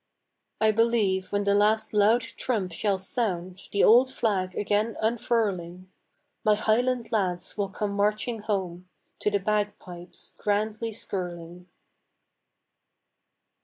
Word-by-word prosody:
I 220 0 +4
believe 215 -4 +1
when 205 0 0
the 200 0 +2
last 215 +2 +2
loud 215 +3 +4
trump 215 -7 -3
shall 195 +3 0
sound, 185 -3 -2
The 200 - +2
old 250 +4 +6
flag 190 -7 -1
again 210 +2 0
unfurling, 200 -6 -1 0.5
My 215 -1 +4
highland 240 +3 0
lads 185 -5 -1
will 200 -2 -2
come 205 +1 -3
marching 210 +3 0
home 185 -4 -3 0.3
To - - +1
the 205 - +1
bagpipes 200 -3 -4
grandly 215 +2 -1
skirling. 175 -4 -6
205 Hz, 115 wpm, -26 LUFS, 185-220 Hz, 0.5 s, old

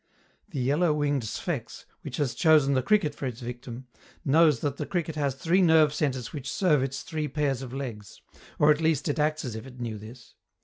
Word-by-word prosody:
The 140 - -4
yellow 150 +5 +2
winged 145 -2 0
Sphex, 130 - -5 0.2
which 140 -5 -6
has 140 -5 0
chosen 155 -4 +4
the 130 - +2
cricket 200 -4 +2
for 140 - -4
its 120 -2 -6
victim, 120 0 -7 0.4
knows 150 -2 +4
that 145 -1 -2
the - - -4
cricket 170 -4 -2
has 140 -3 -1
three 170 +7 +2
nerve 160 -4 +5
centres 130 -6 -2
which 140 -2 -5
serve 155 -8 +2
its 135 0 -3
three 155 -2 -3
pairs 140 -2 -1
of 130 -2 -7
legs 120 -7 -7 0.4
or 150 +1 +5
at 150 +1 +1
least 160 -2 +1
it 145 - -1
acts 155 0 0
as 120 -3 -4
if 110 +4 -7
it 125 -1 -13
knew 115 -3 -4
this. 115 +2 -13
140 Hz, 210 wpm, -27 LUFS, 125-155 Hz, 0.4 s, nerve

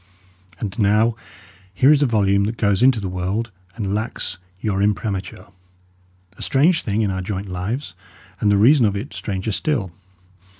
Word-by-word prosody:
And 100 -1 -5
now 110 +3 +3 0.6
here 130 +9 +4
is 150 -1 +4
a 145 - +4
volume 100 -3 +2
that 115 +3 -3
goes 100 -1 +1
into 125 -2 +5
the 100 - -4
world 95 +5 -2 0.2
and 100 -4 -3
lacks 110 -2 -3 0.2
your 100 -1 -1
imprimatur: 100 -2 -2 0.9
a - - -13
strange 160 +5 +3
thing 110 +1 -1
in 100 - 0
our 95 0 -3
joint 95 +1 -4
lives; 95 +6 -4 0.5
and 105 - +2
the 100 - +4
reason 120 +3 +5
of 100 - -1
it 115 +9 -5
stranger 100 +1 -3
still! 110 - -1
105 Hz, 165 wpm, -21 LUFS, 100-115 Hz, 0.9 s, into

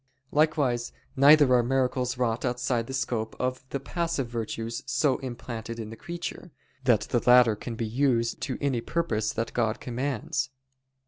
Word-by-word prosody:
Likewise 145 -6 +1 0.2
neither 145 -1 +7
are 125 - +6
miracles 125 0 0
wrought 120 -2 0
outside 120 -1 -1
the - - -6
scope 115 -4 -2
of 130 0 -2
the 140 - -2
passive 165 -1 -2
virtues 115 0 -4
so 135 +1 +2
implanted 120 -3 -6
in 110 -1 -6
the - - -7
creature, 175 +5 -6 0.4
that 115 -5 +4
the 120 +2 0
latter 125 -3 +7
can 115 +2 -6
be 115 - -2
used 120 0 +1
to 130 - -2
any 135 -5 0
purpose 115 -9 -1
that 115 0 -3
God 115 -2 0
commands. 130 0 -2
125 Hz, 155 wpm, -27 LUFS, 115-135 Hz, 0.4 s, neither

